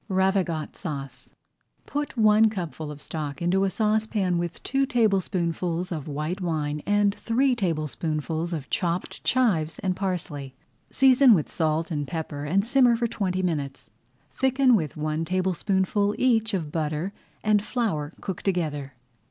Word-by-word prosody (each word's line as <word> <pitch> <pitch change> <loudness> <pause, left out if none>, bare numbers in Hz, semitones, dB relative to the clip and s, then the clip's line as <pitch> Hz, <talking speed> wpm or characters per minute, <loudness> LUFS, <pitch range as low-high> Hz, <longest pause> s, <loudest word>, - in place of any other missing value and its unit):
RAVIGOTE 190 -4 0
SAUCE 135 -7 -7 0.6
Put 290 -2 -4
one 215 0 +5
cupful 165 -7 -5
of 150 -1 -8
stock 150 -2 -5
into 185 +3 +2
a - - +1
saucepan 210 -4 +1
with 175 0 -4
two 270 0 +1
tablespoonfuls 180 -6 0
of 155 -4 -4
white 155 +6 -3
wine 150 -4 -1
and 205 0 +3
three 250 +5 +1
tablespoonfuls 160 - -2
of 155 -5 -4
chopped 175 0 -2
chives 170 - +2
and 185 -1 -1
parsley. 160 -8 -3 0.3
Season 265 -2 +6
with 155 - -2
salt 160 +1 0
and 145 -3 -2
pepper 155 -3 -4
and 195 +7 +1
simmer 245 -1 +4
for 235 +1 0
twenty 185 -5 -1
minutes. 145 -6 -3 0.4
Thicken 265 -1 +4
with 155 -8 -2
one 155 +1 -1
tablespoonful 190 +3 0
each 225 -4 +2
of 160 -5 -3
butter 155 +4 -2 0.3
and 210 -1 +3
flour 195 - -1
cooked 190 -3 -5
together. 150 -7 -1
180 Hz, 140 wpm, -26 LUFS, 155-210 Hz, 0.6 s, Season